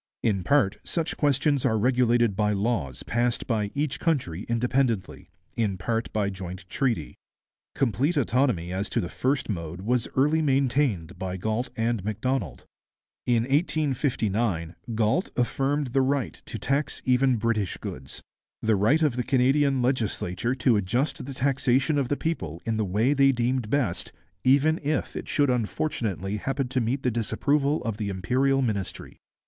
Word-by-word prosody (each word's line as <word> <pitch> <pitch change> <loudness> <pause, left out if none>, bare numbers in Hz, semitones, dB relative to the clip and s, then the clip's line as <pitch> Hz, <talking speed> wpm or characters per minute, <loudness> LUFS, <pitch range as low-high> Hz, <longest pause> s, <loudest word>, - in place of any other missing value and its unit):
In 100 -5 +1
part 120 -2 +2
such 165 -2 -2
questions 145 -1 +2
are 110 -4 +2
regulated 120 -2 +3
by 105 0 +1
laws 100 - -1
passed 120 +1 0
by 105 -4 0
each 145 -1 -1
country 115 - -1
independently, 120 -3 0 0.3
in 105 -5 0
part 115 +5 -2
by 100 -2 0
joint 95 -1 -8
treaty. 115 - -1 0.6
Complete 140 - +1
autonomy 120 -9 +1
as 95 +2 -2
to - - 0
the 85 - -2
first 135 0 -1
mode 85 -3 -4
was 120 +3 0
early 150 +4 +3
maintained 130 - +1
by 95 -1 -3
Galt 110 +6 -2
and 115 -3 0
Macdonald. 110 - -2 0.6
In 120 -2 +3
1859 120 - 0 0.2
Galt 110 - +1
affirmed 135 +2 0
the 135 - +4
right 135 -1 -1
to - - -5
tax 140 +9 -1
even 130 0 +3
British 110 -3 -1
goods, 65 +1 -7 0.4
'the 110 -1 +3
right 115 +12 +3
of 145 -6 +2
the 125 - 0
Canadian 135 +1 +2
legislature 120 -3 -1
to 125 -3 +3
adjust 120 +9 -1
the 140 - -5
taxation 135 +2 +2
of 135 - 0
the 145 - -1
people 85 - -3
in 115 -1 0
the 110 - +1
way 110 +9 +2
they 135 -1 +5
deemed 125 -2 -1
best, 120 -10 -1 0.3
even 145 +5 +4
if 150 -1 -1
it - - -5
should 145 -3 +2
unfortunately 105 - -2
happen 135 +4 -2
to 130 0 0
meet 125 +4 -1
the 125 - +2
disapproval 140 +6 0
of 115 -3 -3
the 105 -2 -2
Imperial 130 +9 +1
Ministry.' 100 -6 -4
120 Hz, 155 wpm, -26 LUFS, 105-135 Hz, 0.6 s, they